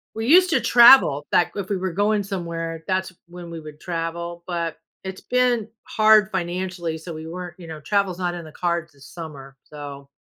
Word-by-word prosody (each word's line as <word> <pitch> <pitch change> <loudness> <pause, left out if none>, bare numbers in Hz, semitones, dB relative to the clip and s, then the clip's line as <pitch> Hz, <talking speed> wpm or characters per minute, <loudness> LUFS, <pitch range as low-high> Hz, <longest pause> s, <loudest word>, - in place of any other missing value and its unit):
we 225 +1 -3
used 360 +5 +6
to - - +3
travel 235 - +7
back 175 - +2
if 200 -2 -5
we 200 - 0
were 185 0 -3
going 205 +3 +1
somewhere, 165 -4 -5
that's 190 -1 -1
when 175 0 -10
we 165 -1 -7
would 155 -1 -11
travel, 170 0 -5
but 170 -3 -3 0.3
it's 190 0 -7
been 245 -3 +1 0.2
hard 215 -1 +4
financially, 175 -2 -3
so 165 +1 -8
we 160 0 -8
weren't, 175 +1 -8
you 170 - -10
know 160 -1 -8
travel's 190 +3 0
not 175 -1 -2
in 170 -2 -8
the 155 - -11
cards 170 -1 -2
this 140 -1 -16
summer, 140 -5 -10
so 140 -2 -10
175 Hz, 195 wpm, -23 LUFS, 165-195 Hz, 0.3 s, travel